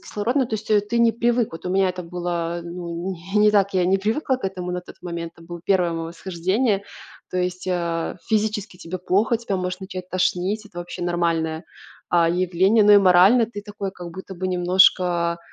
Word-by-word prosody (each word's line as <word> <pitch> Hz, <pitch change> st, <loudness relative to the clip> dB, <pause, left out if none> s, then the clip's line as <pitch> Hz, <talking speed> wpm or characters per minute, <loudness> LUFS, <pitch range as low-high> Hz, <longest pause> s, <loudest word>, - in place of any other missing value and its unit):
кислородны 245 Hz, +5 st, -1 dB
То 225 Hz, -, -3 dB
есть 215 Hz, -, -10 dB, 0.2 s
ты 235 Hz, -, +1 dB
не 235 Hz, -1 st, +5 dB
привык. 235 Hz, -2 st, +1 dB
Вот 165 Hz, 0 st, -9 dB
у -, -, -2 dB
меня 190 Hz, 0 st, +3 dB
это 180 Hz, 0 st, -4 dB
было, 175 Hz, -1 st, -3 dB
э, -, -, -10 dB
ну, 170 Hz, +1 st, -5 dB, 0.2 s
не -, -, +4 dB
не 210 Hz, 0 st, +6 dB
так. 200 Hz, -2 st, +2 dB
Я 180 Hz, -1 st, +2 dB
не 190 Hz, +1 st, +3 dB
привыкла 255 Hz, +6 st, 0 dB
к 260 Hz, -, -10 dB
этому 180 Hz, -2 st, -3 dB
на 180 Hz, -, -2 dB
тот -, -, -13 dB
момент. 170 Hz, -1 st, -5 dB
это 165 Hz, -, -15 dB
был 175 Hz, -1 st, -8 dB
1 180 Hz, -3 st, +2 dB
мое 165 Hz, 0 st, -4 dB
восхождение. 190 Hz, +5 st, -1 dB, 0.5 s
То 185 Hz, -, -2 dB
есть, 180 Hz, 0 st, -2 dB
э, 170 Hz, -3 st, -2 dB
физически 215 Hz, -3 st, -1 dB
тебе 180 Hz, +1 st, -6 dB
плохо, 205 Hz, +6 st, +1 dB
тебя 220 Hz, -4 st, -3 dB
может 180 Hz, 0 st, -3 dB
начать 185 Hz, -1 st, -7 dB
тошнить, 185 Hz, +3 st, 0 dB
это 180 Hz, -4 st, -11 dB
вообще 175 Hz, 0 st, -6 dB
нормальное, 165 Hz, -2 st, -1 dB, 0.5 s
а, 170 Hz, -1 st, +4 dB
явление, 185 Hz, +5 st, +3 dB
но 210 Hz, -, +7 dB
и 205 Hz, -, +9 dB
морально 195 Hz, +5 st, +6 dB
ты 205 Hz, -3 st, -8 dB
такой, 205 Hz, -2 st, -5 dB
как 175 Hz, -2 st, -9 dB
будто 190 Hz, +1 st, -9 dB
бы 185 Hz, +1 st, -3 dB
немножко 175 Hz, -1 st, +3 dB
185 Hz, 205 wpm, -22 LUFS, 175-205 Hz, 0.5 s, и